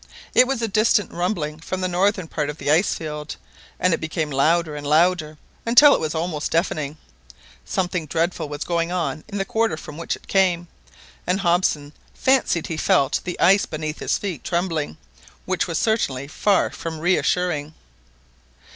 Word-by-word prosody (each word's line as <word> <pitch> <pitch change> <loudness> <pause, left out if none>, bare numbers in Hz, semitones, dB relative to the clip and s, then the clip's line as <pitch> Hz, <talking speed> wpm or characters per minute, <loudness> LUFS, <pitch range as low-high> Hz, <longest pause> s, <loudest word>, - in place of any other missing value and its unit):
It 255 - +6
was 260 -3 -1
a - - +1
distant 215 -1 +2
rumbling 170 -4 -2
from 185 +3 -4
the 185 - +1
northern 185 0 +1
part 150 -2 -2
of 150 - -6
the 145 -1 -1
ice 165 +6 +3
field, 150 -1 -6 0.4
and 180 -1 +3
it - - -1
became 160 -1 -2
louder 155 +3 +2
and 145 -1 -6
louder 155 0 +2 0.3
until 245 +5 +7
it - - +2
was 155 0 -3
almost 160 -2 -2
deafening. 155 -3 -1 0.7
Something 180 - -2
dreadful 165 0 -1
was 145 0 -4
going 170 0 -1
on 170 -3 -2
in 205 -2 -5
the 195 - -1
quarter 220 -5 0
from 150 -1 -9
which 165 - -2
it - - -18
came, 180 -3 +2 0.6
and 185 +2 +1
Hobson 170 -5 +1 0.2
fancied 260 -11 +2
he 165 - -4
felt 140 -2 +2
the 180 - -4
ice 195 +3 +5
beneath 155 0 -4
his - - 0
feet 185 -8 -5
trembling, 170 - -2 0.5
which 185 -1 0
was 165 -2 -2
certainly 140 - 0
far 195 +6 +1
from 165 -1 -6
reassuring. 175 -3 0
170 Hz, 170 wpm, -22 LUFS, 155-185 Hz, 0.7 s, until